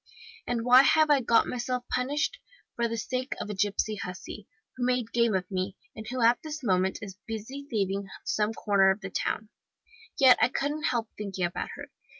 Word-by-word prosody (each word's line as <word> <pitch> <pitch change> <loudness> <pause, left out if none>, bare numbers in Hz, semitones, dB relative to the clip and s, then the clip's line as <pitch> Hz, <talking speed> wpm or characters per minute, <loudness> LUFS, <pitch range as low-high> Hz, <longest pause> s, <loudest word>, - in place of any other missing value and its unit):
And 235 -1 -1
why 250 +1 +8
have 310 +2 +4
I 280 -2 +5
got 230 -1 +4
myself 250 0 -3
punished? 285 - -1 0.4
For 235 0 +1
the 230 0 -3
sake 255 +4 -3
of 210 - -4
a - - -3
gipsy 205 +2 0
hussy, 180 -2 -7 0.3
who 250 - -4
made 250 -2 0
game 235 -3 +3
of 185 -1 0
me, 185 +1 -2 0.2
and 220 - -8
who 250 +1 -2
at 235 +1 +5
this 310 -2 -6
moment 190 -3 +1
is 195 -1 -9
busy 240 +6 -6
thieving 200 -2 -1
in - - -16 0.2
some 215 0 0
corner 200 -3 +3
of 190 +2 0
the 195 -1 -6
town. 215 +2 -2 0.7
Yet 260 -3 +7
I - - +5
couldn't 295 +4 -2
help 230 -5 0
thinking 195 -3 -2
about 175 - -4
her. - - -10
230 Hz, 195 wpm, -28 LUFS, 200-255 Hz, 0.7 s, why